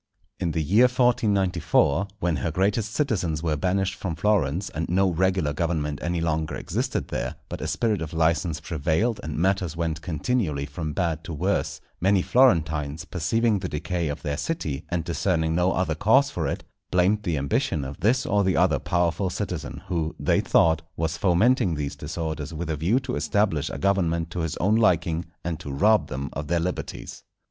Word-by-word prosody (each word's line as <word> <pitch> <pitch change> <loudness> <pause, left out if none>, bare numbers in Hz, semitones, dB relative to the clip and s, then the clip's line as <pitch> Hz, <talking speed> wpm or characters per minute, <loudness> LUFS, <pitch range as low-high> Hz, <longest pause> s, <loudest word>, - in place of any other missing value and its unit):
In 85 -3 -1
the 80 - 0
year 105 +11 +5
1494, 100 - +2
when 85 -5 0
her 65 - -1
greatest 100 +6 0
citizens 90 - 0
were 80 -2 +1
banished 95 +4 0
from 90 -4 -4
Florence, 95 -2 +1
and 80 +2 -3
no 95 +1 +3
regular 90 -3 +1
government 75 -2 -1
any 85 0 -1
longer 80 -1 -1
existed - - -2
there, - - -3
but - - -6
a - - -2
spirit 110 -5 0
of 80 -1 -4
licence 80 0 +1
prevailed, 85 - 0
and 75 0 -5
matters 90 -2 0
went 80 -1 -2
continually 80 - -1
from 75 +2 -5
bad 80 -1 -1
to 85 - -5
worse, 95 +7 -1 0.2
many 95 0 +3
Florentines 80 - +2
perceiving 110 +5 +1
the 90 -1 -4
decay 85 +2 -2
of 75 +1 -5
their 70 -1 -2
city, 80 - -3
and 85 -2 -1
discerning 80 -1 0
no 90 +2 +2
other 90 -4 0
cause 115 - +3
for 80 -4 -2
it, - - -3 0.3
blamed 90 +4 +2
the 85 -7 -1
ambition 70 +1 0
of 70 +2 -7
this 125 +4 +2
or 100 0 +2
the 95 -1 +1
other - - +3
powerful 90 +2 0
citizen, - - -5
who, 80 -2 -2
they - - +2
thought, 80 -1 +3 0.2
was 80 +1 -1
fomenting 95 +2 +3
these 75 -2 -3
disorders 80 -3 -4
with 80 +1 -3
a - - 0
view 90 - +2
to 130 -1 -4
establish 95 -9 +1
a - - -5
government 85 -1 +1
to 90 - -4
his 80 -2 -2
own 105 +4 +2
liking, 85 -6 +2 0.2
and 85 -2 -3
to 75 -3 -7
rob 105 +10 +3
them 70 +2 -5
of 75 0 -4
their 85 +1 +1
liberties. 90 +2 -5
85 Hz, 185 wpm, -25 LUFS, 80-100 Hz, 0.3 s, year